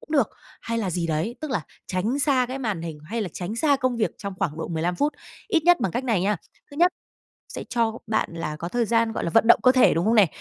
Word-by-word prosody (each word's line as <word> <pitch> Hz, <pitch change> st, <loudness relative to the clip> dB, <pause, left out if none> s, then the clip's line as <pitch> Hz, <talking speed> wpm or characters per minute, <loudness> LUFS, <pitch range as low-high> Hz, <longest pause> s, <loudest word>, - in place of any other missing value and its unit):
cũng -, -, -18 dB
được, 275 Hz, -8 st, +3 dB, 0.3 s
hay 230 Hz, 0 st, -2 dB
là 200 Hz, -5 st, -1 dB
gì 170 Hz, -1 st, -1 dB
đấy. 165 Hz, +10 st, -2 dB
Tức 310 Hz, -2 st, -5 dB
là 215 Hz, -11 st, -1 dB, 0.2 s
tránh 210 Hz, +9 st, -1 dB
xa 265 Hz, -3 st, +2 dB
cái 265 Hz, +1 st, -4 dB
màn 210 Hz, -10 st, -2 dB
hình, 160 Hz, -3 st, -6 dB
hay 225 Hz, +7 st, -3 dB
là 190 Hz, -, -3 dB
tránh 190 Hz, +5 st, -5 dB
xa 285 Hz, +1 st, +3 dB
công 255 Hz, -2 st, 0 dB
việc 220 Hz, -, +1 dB
trong 200 Hz, -2 st, -5 dB
khoảng 160 Hz, -5 st, -2 dB
độ -, -, -4 dB
15 170 Hz, +1 st, -1 dB
phút. 295 Hz, +1 st, +1 dB, 0.4 s
Ít 335 Hz, -7 st, +2 dB
nhất 350 Hz, -6 st, +5 dB
bằng 190 Hz, -7 st, 0 dB
cách 250 Hz, -, -2 dB
này 225 Hz, -8 st, +1 dB
nha, 205 Hz, +2 st, +1 dB, 0.3 s
thứ 285 Hz, -, -11 dB
nhất, 355 Hz, +2 st, +4 dB, 0.6 s
sẽ -, -, -6 dB
cho 230 Hz, -1 st, 0 dB
bạn 220 Hz, 0 st, 0 dB
là 155 Hz, -2 st, -4 dB
có 170 Hz, +3 st, -5 dB
thời 240 Hz, +1 st, 0 dB
gian, 230 Hz, 0 st, +2 dB
gọi -, -, -3 dB
là, -, -, -1 dB
vận 225 Hz, +6 st, +3 dB
động -, -, +7 dB
cơ 255 Hz, -, +7 dB
thể, 255 Hz, -1 st, +5 dB
đúng 165 Hz, +4 st, 0 dB
không 225 Hz, -, +3 dB
nè? 205 Hz, -5 st, +6 dB
225 Hz, 275 wpm, -24 LUFS, 180-255 Hz, 0.6 s, động